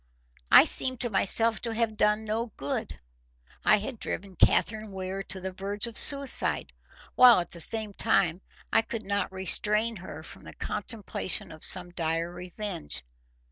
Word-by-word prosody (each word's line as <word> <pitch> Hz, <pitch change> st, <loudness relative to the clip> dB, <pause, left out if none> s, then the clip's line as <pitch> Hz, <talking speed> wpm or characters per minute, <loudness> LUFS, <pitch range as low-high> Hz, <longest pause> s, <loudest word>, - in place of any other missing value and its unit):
I -, -, +8 dB
seemed 255 Hz, -2 st, +2 dB
to 240 Hz, -, -3 dB
myself 225 Hz, +3 st, +2 dB
to 230 Hz, -2 st, -5 dB
have 225 Hz, -1 st, -2 dB
done 210 Hz, +1 st, 0 dB
no 225 Hz, +2 st, -3 dB
good. 140 Hz, +1 st, -5 dB, 0.6 s
I 215 Hz, -, +4 dB
had 220 Hz, +3 st, -7 dB
driven 190 Hz, 0 st, -5 dB
Catherine 215 Hz, +2 st, 0 dB
Weir 190 Hz, 0 st, -6 dB
to 195 Hz, -1 st, -5 dB
the 190 Hz, 0 st, -6 dB
verge 200 Hz, +3 st, -2 dB
of 235 Hz, -1 st, -6 dB
suicide, 280 Hz, +1 st, +5 dB, 0.4 s
while 250 Hz, -4 st, +6 dB
at 175 Hz, -, -6 dB
the 170 Hz, -, -7 dB
same 215 Hz, +2 st, +3 dB
time 190 Hz, -5 st, 0 dB, 0.3 s
I -, -, +4 dB
could 225 Hz, 0 st, -7 dB
not 200 Hz, -2 st, -3 dB
restrain 210 Hz, +4 st, 0 dB
her 160 Hz, -4 st, -11 dB
from -, -, -14 dB
the -, -, -13 dB
contemplation 210 Hz, -3 st, -5 dB
of 155 Hz, -1 st, -5 dB
some 180 Hz, -1 st, +3 dB
dire 165 Hz, 0 st, -3 dB
revenge. 180 Hz, -, -7 dB
205 Hz, 160 wpm, -26 LUFS, 185-225 Hz, 0.6 s, I